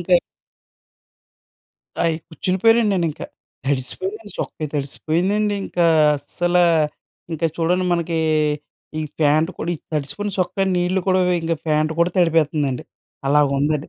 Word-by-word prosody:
ఇంకా - - +2 1.9
ఆయ్ 165 -1 +2
కుచ్చుండిపోయానండి 210 +7 +2
నేనింకా. 170 -5 -1 0.4
తడిసిపోయిందండి 190 - -3
చొక్కా, 155 - -4
తడిసిపోయిందండి. 180 +9 0
ఇంకా 175 -1 0 0.3
అస్సల, 175 +5 -2 0.8
ఇంకా 165 +1 0
చూడండి 180 +2 +1
మనకి 170 -1 0 0.8
ఈ - - -1 0.2
ప్యాంట్ 155 +3 +3
కూడా 170 - -2
ఈ - - -5 0.2
తడిసిపోయిన 155 +8 -2
చొక్క 185 +2 0
నీళ్లు 180 +2 +1
కూడా 185 0 +4 0.2
ఇంకా 165 0 0
ప్యాంట్ 155 +1 +2
కూడా 170 +1 +3
తడిపేత్తందండి. 155 -6 +1 0.4
అలాగుందండి. 145 +1 +2
165 Hz, 110 wpm, -21 LUFS, 150-185 Hz, 1.9 s, కూడా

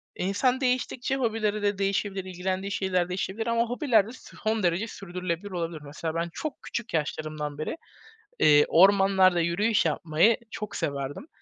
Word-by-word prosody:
E, - - -4
insan 250 +7 +1
değiştikçe 255 0 0
hobileri 220 -4 0
de 205 -1 0
değişebilir, 195 -1 -1
ilgilendiği 185 +2 -3
şeyler 185 -2 0
değişebilir 190 +5 -3
ama 230 0 +2
hobiler 240 -4 +2
de - - -8
son 220 -3 -4
derece 175 +6 +1
sürdürülebilir 180 -1 -5
olabilir. 165 -3 -4
Mesela, 155 +3 -5
ben 170 +1 -1
çok 310 -2 -5
küçük 235 0 -5
yaşlarımdan 155 -1 -3
beri, 155 - -4 0.6
iii, 150 -1 +6
ormanlarda 190 0 +5
yürüyüş 195 +6 +2
yapmayı 165 +7 +3
çok 210 -1 -6
severdim. 140 - -3
190 Hz, 145 wpm, -27 LUFS, 170-220 Hz, 0.6 s, iii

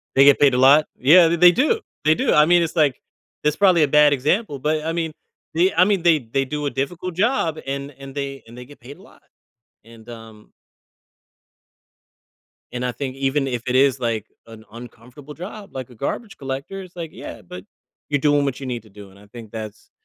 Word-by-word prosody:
They 135 +1 +6
get 140 -1 +6
paid 140 -3 +4
a - - +1
lot? 140 +4 +6
Yeah, 165 +6 +6
th 170 0 -1
they 180 0 +8
do. 305 - +1 0.2
They 155 +1 +4
do, - - 0
I 150 0 +5
mean, 175 0 +4
it's 165 +1 -4
like 145 -5 +2 0.4
it's 150 0 +1
probably 185 -5 +4
a 150 - +3
bad 150 0 +5
example, 145 - 0
but, 155 +3 -1
I 165 - -2
mean, 165 -2 -3 0.4
they 180 +4 +2
I 180 +2 +5
mean, 200 -4 0
they 170 -3 +4
they 130 +4 -2
do 150 +2 -4
a - - -1
difficult 170 +6 -4
job 185 - 0
and 140 +1 -4
and 135 -1 -11
they 140 -1 -5
and 115 +2 -14
they 125 - -9
get 145 +3 -17
paid 130 +4 -12
a - - -17
lot. - - -20 0.6
And 115 0 -17
um 110 -2 -13 2.2
and 125 0 -4
I 125 - -2
think 130 +2 -6
even 135 +1 0
if 120 -3 -4
it 125 - -1
is 135 0 +3
like 115 -3 -2 0.2
an 110 -1 -13
uncomfortable 125 +5 -12
job, 200 +2 -10
like 130 -1 -7
a - - -14
garbage 195 - -5
collector, 140 +8 -6
it's 180 -1 -15
like, 165 -2 -6
"Yeah, - - -9
but 90 +1 -11 0.4
you're 145 -2 0
doing 145 -1 +2
what 140 -2 -3
you 135 - -6
need 120 -3 -4
to 110 - -20
do," 100 0 -13
and 95 - -19
I 105 - -18
think 110 +1 -12
that's 110 -1 -9
140 Hz, 220 wpm, -21 LUFS, 125-165 Hz, 2.2 s, they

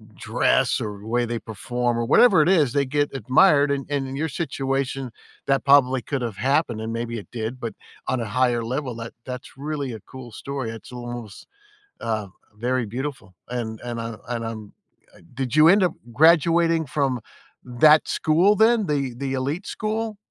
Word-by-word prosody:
dress, - - +1
or 105 -2 -5
the 105 - -11
way 120 +1 +1
they 120 0 -3
perform, 120 +3 -2
or 120 - 0
whatever 190 - +6
it 165 - +1
is, 150 -10 +3
they 140 -1 +2
get 145 +2 0
admired, 140 +2 +4
and 140 -1 -2
and 140 -2 -1
in 130 - -6
your 160 +3 -2
situation, 135 -3 -2 0.4
that 135 0 +1
probably 130 -2 +5
could've 120 -7 -3
happened, 135 -4 +1
and 110 +1 -4
maybe 115 0 -3
it 100 - -12
did, 115 +1 -4
but 115 -3 -4 0.3
on 130 - 0
a - - -2
higher 120 +2 +1
level, 130 +1 -3
that 115 0 -7
that's 125 0 -8
really 140 -2 -4
a 110 - -7
cool 130 +1 -11
story. 135 +1 -5
It's 115 +1 -11
almost, 120 -3 -8 0.5
uh, 110 -3 -2 0.3
very 125 +2 -1
beautiful. 120 -4 -6
And 115 -3 -4
and 120 -1 -4
I 115 -1 -5
and 120 -1 -3
I'm 110 -2 -7 0.4
uh, - - -18
did 130 0 -3
you 155 +1 +7
end 195 +3 +6
up 180 -3 +2 0.2
graduating 165 +3 +4
from 135 -2 -1 0.4
that 150 +5 +5
school 175 +7 +3
then, 220 0 +4
the 140 -4 -1
the 135 +1 -3
elite 140 +8 -2
school? 220 0 -3
130 Hz, 180 wpm, -23 LUFS, 120-150 Hz, 0.5 s, you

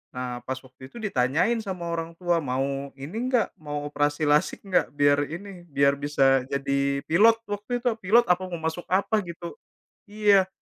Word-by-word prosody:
Nah, 125 -1 -4
pas 130 0 -2
waktu 130 0 -14
itu - - -11
ditanyain 155 - +1
sama 185 -4 -5
orang 165 0 -3
tua, 175 -2 +1
mau 135 +1 -2
ini 145 +9 -7
enggak 250 -3 +1
mau 145 -1 -5
operasi 145 +1 0
lasik 150 +1 +2
enggak? 185 -2 +2
Biar 145 0 +3
ini 180 +1 -8
biar 140 0 +3
bisa 135 -2 +3
jadi 140 0 0
pilot 220 +8 +5
waktu 210 +4 -3
itu, 245 - +2
pilot 220 +6 +5
apa 180 +1 +2
mau 170 -2 -5
masuk 160 +2 -3
apa 200 +3 +2
gitu. 170 0 -8 0.6
Iya, 205 -2 +4
160 Hz, 170 wpm, -25 LUFS, 140-190 Hz, 0.6 s, pilot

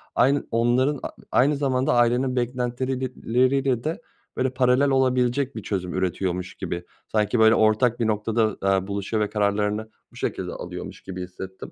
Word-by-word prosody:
aynı 140 +2 +3
onların 125 +5 +2
a - - -3 0.2
aynı 145 +4 +4
zamanda 130 -2 +1
ailenin 125 +2 +2
beklentileriyle 125 +1 0
de, 165 +9 -3 0.4
böyle, 130 - +1
paralel 130 +2 +3
olabilecek 130 0 +1
bir 110 - -6
çözüm 90 -3 -3
üretiyormuş 90 0 -2
gibi, 85 0 -4 0.3
sanki, 110 +2 +1
böyle, 110 0 +6
ortak 110 +2 +3
bir 115 - +1
noktada, 110 0 0
aaa, 95 -1 +1
buluşuyor 100 +2 -1
ve 105 - -2
kararlarını 105 +1 0 0.2
bu - - -20
şekilde - - -3
alıyormuş - - -7
gibi 90 -1 -6
hissettim. 95 +1 -9
120 Hz, 150 wpm, -24 LUFS, 105-130 Hz, 0.4 s, böyle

